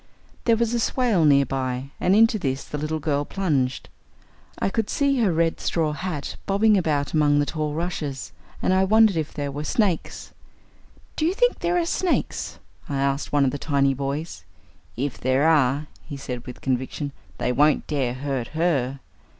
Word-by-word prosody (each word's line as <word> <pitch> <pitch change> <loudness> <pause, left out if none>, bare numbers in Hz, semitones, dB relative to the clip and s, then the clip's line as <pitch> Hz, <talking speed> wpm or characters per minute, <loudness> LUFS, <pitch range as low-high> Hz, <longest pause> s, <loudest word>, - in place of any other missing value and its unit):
There 230 -2 +4
was 235 0 0
a 240 - +1
swale 230 -8 +2
near 140 -2 +5
by, 130 0 -3
and 190 - +3
into 225 0 +5
this 135 -4 -2
the 150 - -5
little 155 +1 -2
girl 145 -2 0
plunged. 145 -8 -1 0.7
I 195 - -1
could 225 -1 -1
see 280 -2 +1
her 215 -6 +3
red 165 0 +1
straw 160 -3 0
hat 150 -2 -4
bobbing 210 +2 +4
about 150 -6 0
among 150 -2 +3
the 145 - +3
tall 150 -1 -3
rushes, 155 -5 -4 0.3
and - - +3
I 190 0 +4
wondered 215 0 +5
if 155 -2 -2
there 145 -2 -4
were 145 +2 -4
snakes. 190 0 -1 0.8
"Do - - -2
you 365 - 0
think - - +2
there 350 +1 +1
are 345 - +1
snakes?" 355 +1 -1 0.3
I 140 - -2
asked 140 +1 -1
one 145 -1 +3
of 130 - +1
the 145 - -5
tiny 140 -2 +2
boys. 140 - -4 0.5
"If 135 +1 -3
there 130 +4 +2
are," 145 -2 +3 0.2
he 145 -3 -7
said 125 -3 -6
with 125 - -9
conviction, 130 +2 -2 0.3
"they - - 0
won't 150 +4 +3
dare 130 -5 -1
hurt 135 -3 -3
her." 140 -6 0
150 Hz, 180 wpm, -24 LUFS, 140-190 Hz, 0.8 s, near